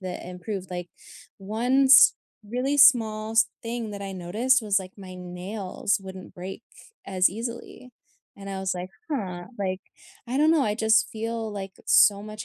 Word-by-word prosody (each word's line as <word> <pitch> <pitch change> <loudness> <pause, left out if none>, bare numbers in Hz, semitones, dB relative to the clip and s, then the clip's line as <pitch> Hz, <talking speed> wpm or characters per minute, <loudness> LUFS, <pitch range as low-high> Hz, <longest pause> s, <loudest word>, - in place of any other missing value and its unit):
that 185 -2 -6
improved, 185 +1 -6
like, 175 -1 -5 0.5
one 235 +7 +1
s 270 +1 +8 0.3
really 255 +6 -1
smallest 225 -4 +5
thing 230 -1 -4
that 200 -1 -7
I 195 -1 -5
noticed 220 +9 +1
was, 205 -2 +2
like, 185 +1 -10
my 185 -1 -10
nails 185 +3 -3
wouldn't 190 -1 -10
break 190 +5 -8 0.4
as 185 -1 +3
easily, 235 +3 -7 0.5
and 195 0 -8
I 195 - -4
was 190 -1 -1
like, 180 +1 -6 0.2
"Huh," 180 -10 -4
like, 185 -1 -2 0.5
I 250 +3 -3
don't 305 +2 +4
know. 320 -4 +4
I 210 -4 0
just 220 0 +3
feel, 225 0 -4
like, 195 -2 -6
so 200 -1 +5
much 215 0 -8
205 Hz, 165 wpm, -25 LUFS, 185-230 Hz, 0.5 s, s